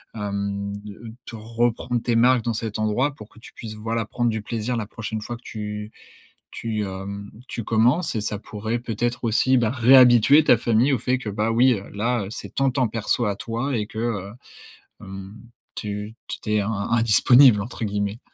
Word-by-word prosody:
Hem, 100 -1 -3
de 105 +2 -10
te 115 - -8
reprendre 115 +2 -1
tes 120 - 0
marques 120 +1 +4
dans 115 - -1
cet 110 -1 -4
endroit 110 +7 +1
pour 105 -4 -12
que - - -18
tu - - -14
puisses, 110 -2 -8
voilà, 115 +1 -2
prendre 120 +2 -1
du 110 -1 -3
plaisir 115 +3 -3
la 110 - -2
prochaine 110 0 -5
fois 120 +3 -5
que 120 - -24
tu 105 0 -6 0.6
tu, 110 -2 -3
hem, 100 +1 -7 0.2
tu 115 - -5
commences 125 +10 +2
et 110 - -1
ça 105 0 -3
pourrait 110 +2 -4
peut-être 120 +1 -3
aussi, 130 +4 +3
bah, 115 -3 +2
réhabituer 130 +2 +6
ta 125 - +5
famille 120 +5 +2
au 130 - +1
fait 125 +3 0
que, 115 - -5
bah, 105 +2 -1
oui, 125 +3 +4
heu, 100 -1 -8
là, 115 +1 -1
c'est - - -8
ton 135 -1 +2
temps 130 -1 +1
perso 115 +2 -1
à 100 -1 -1
toi 120 +5 -3
et 105 - -2
que, 110 - -7
heu, 105 -4 -3 0.7
hem, 95 +1 -9 0.4
tu 105 0 -5
tu - - -6
tu 105 - -6
es 105 - +3
in 100 +2 -2 0.2
«indisponible» 115 +1 +6
entre 115 +2 -6
guillemets. 100 +1 -2
115 Hz, 195 wpm, -23 LUFS, 105-120 Hz, 0.7 s, réhabituer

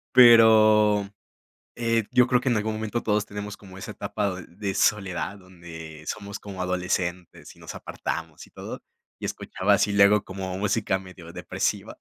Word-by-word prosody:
Pero, 110 -4 +7 0.7
eh, 115 -1 +1
yo 125 -1 +5
creo 125 -1 +2
que 130 - 0
en 120 - +2
algún 110 +1 -1
momento 110 +2 -3
todos 105 -1 0
tenemos 105 0 -7
como 95 -2 -14
esa 95 - -7
etapa 100 -3 -3
de 90 -2 -9
de 95 +2 -4
soledad, 100 -1 0
donde 85 -4 -11
somos 100 -1 -5
como 95 -3 -7
adolescentes, 90 -1 -3
y - - -21
nos - - -9
apartamos - - -6
y - - -21
todo. - - -8 0.4
Y - - -6
escuchaba - - 0
así 105 - +2
luego 100 0 +5
como 95 -1 -5
música 100 -1 0
medio 90 -3 -12
depresiva. - - -3
100 Hz, 165 wpm, -25 LUFS, 95-110 Hz, 0.7 s, Pero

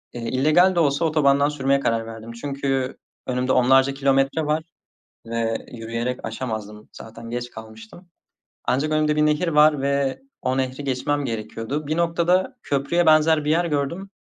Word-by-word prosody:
ııı, 120 - -5
illegal 155 +9 +3
de 170 - +2
olsa 145 +1 +2
otobandan 145 -2 +3
sürmeye 140 -1 +1
karar 115 -3 0
verdim. 115 0 -9
Çünkü 135 +1 -3 0.3
önümde 125 0 -1
onlarca 135 +2 +4
kilometre 135 +2 +1
var 155 +1 0 0.6
ve 115 -1 -2
yürüyerek 115 +2 -4
aşamazdım. 110 -3 -6
Zaten 115 +1 -10
geç 120 0 -4
kalmıştım. 110 +10 -12 0.6
Ancak 145 +4 0
önümde 155 0 +2
bir 150 - +3
nehir 150 +4 +1
var 150 -2 +4
ve 140 - 0 0.2
o 130 +1 -1
nehri 130 +2 -2
geçmem 140 +2 -1
gerekiyordu. 115 +5 -4
Bir 155 - -1
noktada 170 +6 +1
köprüye 145 +5 0
benzer 155 -1 +4
bir 150 - +2
yer 170 +2 +2
gördüm. 170 +6 -2
140 Hz, 150 wpm, -23 LUFS, 120-155 Hz, 0.6 s, onlarca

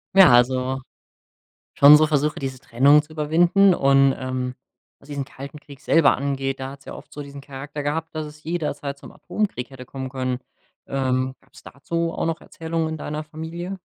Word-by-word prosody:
Ja, 190 -5 +9
also 130 +2 +2 0.9
schon 145 +1 +9
so 155 - +4
Versuche, 150 0 0
diese 135 -1 -4
Trennung 135 +4 +4
zu 155 +1 -17
überwinden. 170 +5 +4
Und, 135 -2 +4
ähm, 130 -1 -3 0.4
was 140 - -20
diesen 140 -2 -4
Kalten 140 +3 -10
Krieg 140 -3 -14
selber 165 -3 +4
angeht, 135 -1 -2
da 130 0 -4
hat's 140 0 -13
ja - - -7
oft - - -13
so 150 - -8
diesen 140 0 -10
Charakter 140 +1 -7
gehabt, 160 +3 -3
dass 155 0 -3
es 150 0 -12
jederzeit 150 -4 -3
zum - - -13
Atomkrieg 200 - -3
hätte 135 -2 -11
kommen 130 +1 -6
können. 130 -1 -2 0.5
Ähm, 130 -1 -1
gab's - - -18
dazu 165 +4 -3
auch - - -2
noch 165 0 -2
Erzählungen 165 0 -3
in 160 - -4
deiner 150 0 -5
Familie? 165 +5 -6
140 Hz, 180 wpm, -23 LUFS, 135-160 Hz, 0.9 s, Ja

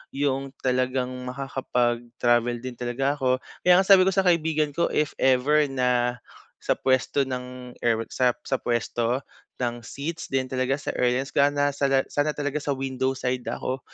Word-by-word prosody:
Yung 135 -1 -1
talagang 130 0 0 0.2
makakapag-travel 120 -2 0
din 125 -2 -7
talaga 135 +4 -1
ako. 130 -1 +1 0.2
Kaya 180 0 +6
nga - - +4
sabi 190 -2 +7
ko - - +4
sa 195 - +3
kaibigan 160 -4 +2
ko, 170 +4 +1
"If 150 -1 0
ever 140 +4 +3
na 125 -2 0 0.4
sa - - 0
puwesto 130 +1 +1
ng 125 -1 -6
air," 115 -1 +2
what 115 - -5
sap 125 -1 +1
sa 135 - +1
puwesto 120 +1 -1 0.4
ng 120 0 -2
seats 160 +7 -5
din 135 -1 +2
talaga 130 +1 0
sa - - -3
airlines, 125 +2 +1
ga 140 - +4
na 145 0 +2
saga 135 -1 +1
"sana 145 +1 +1
talaga 145 0 -2
sa 145 - 0
window 130 0 -1
side 125 -1 -2
ako." 130 +2 -3
130 Hz, 170 wpm, -25 LUFS, 125-140 Hz, 0.4 s, sabi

